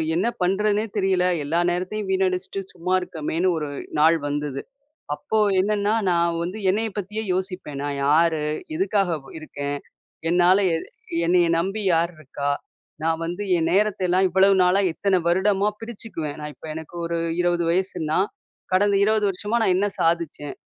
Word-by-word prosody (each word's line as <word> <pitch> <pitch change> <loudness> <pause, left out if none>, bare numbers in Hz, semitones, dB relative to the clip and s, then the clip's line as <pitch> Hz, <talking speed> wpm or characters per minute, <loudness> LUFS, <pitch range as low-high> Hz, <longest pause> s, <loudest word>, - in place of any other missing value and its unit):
என்ன 185 +7 +1
பண்ணுறதுன்னே 205 +3 +2
தெரியல, 190 -2 +2 0.2
எல்லா 165 +4 0
நேரத்தையும் 190 +3 -3
வீணடிச்சிட்டு 190 0 0
சும்மா 180 +2 -2
இருக்கமேன்னு 175 0 -1
ஒரு 150 -2 -3 0.3
நாள் 165 +2 +5
வந்தது. 145 -1 -3 0.5
அப்போ 220 +8 -2 0.2
என்னன்னா, 205 +1 +1 0.2
நான் 170 -1 +1
வந்து 185 +5 -4
என்னைய 220 +3 0
பத்தியே 210 +3 -3
யோசிப்பேன், 185 -7 -4
நான் 140 -1 -3
யாரு? 160 +1 +3 0.3
எதுக்காக 190 -2 +1
வ் - - -13
இருக்கேன்? 145 -2 -4 0.5
என்னால 180 +2 +5 0.2
எ - - +2 0.5
என்னைய 175 0 +4
நம்பி 195 +5 -1
யார் 170 +2 +1
இருக்கா? 145 -1 -3 0.5
நான் 165 0 0
வந்து 175 +5 -4
என் 165 0 +1
நேரத்த 210 +1 +2
எல்லாம் 185 +2 +3
இவ்வளவு 190 +2 +5
நாளா, 180 +2 +4
இத்தன 195 +1 +1
வருடமா 195 +3 +2
பிரிச்சுக்குவேன். 215 -10 -6
நான் 150 0 -6
இப்ப 160 - -12
எனக்கு 160 +2 -8
ஒரு 170 0 -2 0.2
20 175 -1 +1
வயசுன்னா, 170 -4 0 0.6
கடந்த 200 +1 +3
20 215 0 +3
வருஷமா 210 +5 -1
நான் 185 - +3
என்ன 205 - +2
சாதிச்சேன்? 165 -3 0
180 Hz, 150 wpm, -23 LUFS, 165-195 Hz, 0.6 s, நாள்